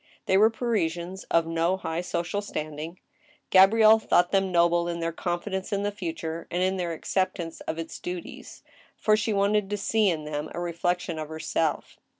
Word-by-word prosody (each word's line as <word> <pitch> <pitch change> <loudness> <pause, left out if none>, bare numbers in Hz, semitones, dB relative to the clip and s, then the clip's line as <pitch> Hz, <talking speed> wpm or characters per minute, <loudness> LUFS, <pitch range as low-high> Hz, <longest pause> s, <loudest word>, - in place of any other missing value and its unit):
They 190 - +2
were 215 +3 +6
Parisians 190 -6 -2
of 165 -1 +2
no 165 +3 0
high 165 -2 -3
social 180 +3 -2
standing. 155 -2 -6 0.5
Gabrielle 215 +3 +7
thought 175 -4 +2
them 195 -1 +2
noble 170 0 +3
in 170 0 -3
their 165 0 -1
confidence 185 +3 -3
in 200 0 0
the 205 - 0
future, 165 -4 -5
and 180 +1 0
in 190 +1 +1
their 175 -2 -2
acceptance 170 0 -2
of 160 - -2
its 165 0 -6
duties, 180 -1 -7 0.3
for 215 - +3
she 215 +1 -1
wanted 200 0 +2
to 205 - -1
see 210 +1 +2
in 160 -3 -2
them 150 0 -4
a - - -3
reflection 175 -1 -2
of 155 -1 -5
herself. 160 -1 -2
175 Hz, 175 wpm, -26 LUFS, 165-200 Hz, 0.5 s, Gabrielle